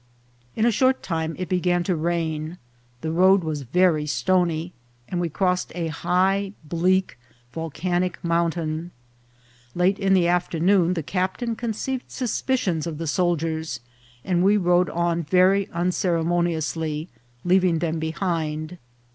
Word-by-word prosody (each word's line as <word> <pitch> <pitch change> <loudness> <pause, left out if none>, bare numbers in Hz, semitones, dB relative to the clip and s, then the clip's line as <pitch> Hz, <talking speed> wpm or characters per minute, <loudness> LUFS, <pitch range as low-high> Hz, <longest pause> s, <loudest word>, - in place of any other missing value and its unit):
In 220 - +1
a 240 - +4
short 260 +4 +2
time 160 -2 -2
it 185 - -4
began 175 0 +1
to 180 0 0
rain; 160 0 -2 0.4
the 160 - -2
road 185 +3 +4
was 155 -2 -3
very 155 +3 +2
stony, 175 +1 0 0.3
and 175 -1 -2
we 170 - -1
crossed 180 +2 0
a 170 -2 -2
high, 190 +5 +1
bleak 175 -1 0 0.3
volcanic 175 +3 -2
mountain. 170 -1 -1 0.9
Late 180 +3 +2
in 195 -1 +3
the 175 -2 +3
afternoon 175 +1 +2
the 165 - -2
captain 190 - -2
conceived 245 +3 -3
suspicions 230 - -1
of 160 -3 -5
the 165 - -4
soldiers, 165 -1 -1 0.5
and 180 -1 +1
we 205 +2 +5
rode 180 -1 +3
on 170 0 0
very 185 +4 +3
unceremoniously, 170 -3 -1 0.4
leaving 180 -1 +3
them 160 0 -1
behind. 160 0 -3
175 Hz, 130 wpm, -24 LUFS, 160-185 Hz, 0.9 s, we